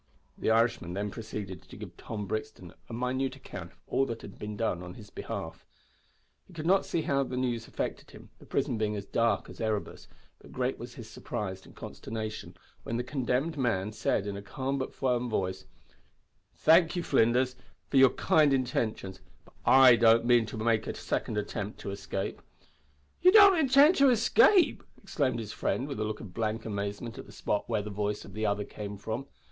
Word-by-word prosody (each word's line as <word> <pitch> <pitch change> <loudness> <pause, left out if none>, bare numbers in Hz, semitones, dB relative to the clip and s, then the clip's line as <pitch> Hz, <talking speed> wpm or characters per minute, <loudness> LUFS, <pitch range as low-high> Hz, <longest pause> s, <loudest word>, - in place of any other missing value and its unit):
The - - -1
Irishman 110 -6 +2
then 100 +1 -2
proceeded 105 -5 -6
to - - -14
give - - -9
Tom 105 -2 -6
Brixton 110 -4 -5 0.2
a - - -9
minute 130 +3 -1
account 95 -9 -9
of - - -29
all 135 - +1
that 115 -1 -6
had 100 - -11
been 105 0 -6
done 100 -6 -1
in 90 0 -9
his 105 -2 -13
behalf. 80 0 -6 0.8
He 185 - -17
could 160 -2 -6
not 190 +3 +3
see 165 - -1
how 140 -1 +1
the 130 -2 -3
news 120 -3 -1
affected - - -4
him, - - -14
the - - -16
prison 115 - -1
being 105 -1 0
as 100 -1 -5
dark 115 -2 +1
as - - -10
Erebus, 110 -2 -3 0.3
but - - -16
great 130 +1 -2
was 120 +1 -8
his 115 -3 -9
surprise 105 -4 -5
and - - -16
consternation 110 -1 -6 0.2
when 115 - -3
the 120 - -1
condemned 135 +4 -1
man 105 -5 0
said, 110 -2 0
in 100 -1 -4
a 100 - -6
calm 135 +6 -3
but 130 - -3
firm 125 -2 -1
voice, 95 -4 -2 0.9
"Thank 165 +2 +5
you, 175 - -1
Flinders, 125 +1 +2 0.4
for 140 - +3
your 135 -1 +8
kind 150 +2 +3
intentions, 110 -7 -1 0.3
but - - -21
I 130 -2 +8
don't 115 0 +5
mean 120 -2 +4
to 110 - -7
make 110 0 +1
a - - -3
second 105 - -2
attempt 105 0 -4
to 100 - -5
escape." 100 0 -4 0.8
"Ye 365 - +7
don't 405 -1 +9
intind 280 +4 +6
to 275 -1 +6
escape!" 340 - +4 0.2
exclaimed 130 -5 -1
his 110 -2 -5
friend, 135 - -1
with 140 -7 -5
a - - 0
look 105 0 -4
of 100 -6 -10
blank 110 +2 -2
amazement 105 +2 -4
at - - -9
the - - -13
spot 105 - -2
where 110 -3 0
the 105 - -6
voice 105 +1 -2
of - - -12
the 110 0 -1
other 105 0 0
came 105 -1 -7
from. 110 +7 -5
115 Hz, 195 wpm, -29 LUFS, 105-130 Hz, 0.9 s, don't